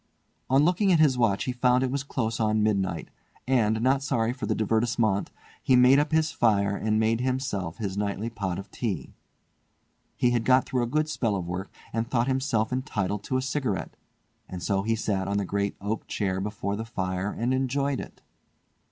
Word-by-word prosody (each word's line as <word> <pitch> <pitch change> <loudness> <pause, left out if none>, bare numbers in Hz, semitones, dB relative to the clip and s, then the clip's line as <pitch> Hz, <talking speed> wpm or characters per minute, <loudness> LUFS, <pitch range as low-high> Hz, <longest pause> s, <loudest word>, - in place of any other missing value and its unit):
On 135 +3 +4
looking 185 +3 +3
at 175 - +5
his 150 -4 +4
watch 115 -5 +2
he 130 - -1
found 125 +1 +2
it 130 - 0
was 140 0 -1
close 115 -5 -2
on 110 -1 +2
midnight; 95 -6 0 0.4
and, 110 -4 +2
not 135 +1 +3
sorry 120 -4 0
for 130 - -5
the - - +1
divertissement, 110 -2 +1 0.3
he 130 - +3
made 125 +2 +6
up 145 - 0
his 155 0 +2
fire 100 -6 +2
and 110 +1 0
made 115 +1 +1
himself 125 -10 -2
his 100 -4 -3
nightly 105 +1 -2
pot 100 -6 -3
of 100 - -8
tea. 95 - -4 1.0
He 120 - +2
had 120 -2 +1
got 130 +2 +4
through 125 - -1
a 120 - 0
good 155 +5 0
spell 115 -9 -1
of 90 -3 -3
work, 90 +3 -4 0.2
and 115 +1 -1
thought 120 -2 +2
himself 130 -4 0
entitled 105 -7 -2
to 130 - 0
a 130 - -1
cigarette; 130 -7 -2 0.5
and 90 -2 -6
so 100 -1 +1
he 115 +3 0
sat 100 -4 -1
on 100 +1 0
the 100 - 0
great 100 +1 -1
oak 105 +3 -3
chair 95 -2 -1
before 100 0 -3
the 110 - -4
fire 95 -3 -3
and 120 +3 -1
enjoyed 135 +1 0
it. - - -10
115 Hz, 195 wpm, -27 LUFS, 100-130 Hz, 1.0 s, made